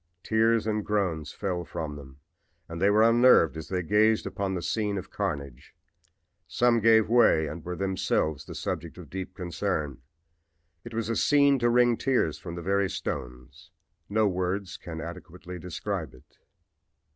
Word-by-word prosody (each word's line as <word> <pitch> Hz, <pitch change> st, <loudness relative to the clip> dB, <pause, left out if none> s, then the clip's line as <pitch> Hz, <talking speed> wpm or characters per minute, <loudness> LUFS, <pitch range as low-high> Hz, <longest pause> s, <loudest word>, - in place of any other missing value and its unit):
Tears 115 Hz, 0 st, +2 dB
and 105 Hz, -1 st, -1 dB
groans 90 Hz, -9 st, -1 dB
fell 90 Hz, -4 st, -3 dB
from 75 Hz, -3 st, -5 dB
them 70 Hz, -1 st, -12 dB, 0.5 s
and 85 Hz, +1 st, -7 dB
they 100 Hz, -, +5 dB
were 110 Hz, +2 st, +5 dB
unnerved 120 Hz, -8 st, +5 dB
as 80 Hz, -1 st, -7 dB
they 90 Hz, -1 st, -2 dB
gazed 105 Hz, +4 st, +3 dB
upon 95 Hz, 0 st, -3 dB
the 90 Hz, -, -4 dB
scene 105 Hz, -2 st, -1 dB
of 95 Hz, -, -7 dB
carnage. 70 Hz, -10 st, -5 dB, 0.7 s
Some 120 Hz, -1 st, +2 dB
gave 110 Hz, -1 st, +5 dB
way 115 Hz, -9 st, +4 dB
and 75 Hz, +2 st, -7 dB
were 90 Hz, +1 st, -4 dB
themselves 95 Hz, -6 st, -1 dB
the -, -, -9 dB
subjects 80 Hz, +1 st, -4 dB
of 85 Hz, -5 st, -11 dB
deep 95 Hz, -1 st, -6 dB
concern. 85 Hz, -6 st, -3 dB, 0.8 s
It 120 Hz, -1 st, -9 dB
was 115 Hz, 0 st, -2 dB
a 115 Hz, -, 0 dB
scene 140 Hz, 0 st, +4 dB
to 120 Hz, 0 st, +2 dB
wring 120 Hz, -1 st, +4 dB
tears 125 Hz, -, 0 dB
from 85 Hz, -, -7 dB
the 85 Hz, -, -6 dB
very 100 Hz, +1 st, +1 dB
stones. 65 Hz, -1 st, -6 dB, 0.4 s
No 110 Hz, +1 st, +2 dB
words 95 Hz, +1 st, -2 dB
can 80 Hz, -2 st, -7 dB
adequately 90 Hz, +2 st, -9 dB
describe 85 Hz, -5 st, -5 dB
it. 65 Hz, -, -23 dB
95 Hz, 160 wpm, -27 LUFS, 80-110 Hz, 0.8 s, they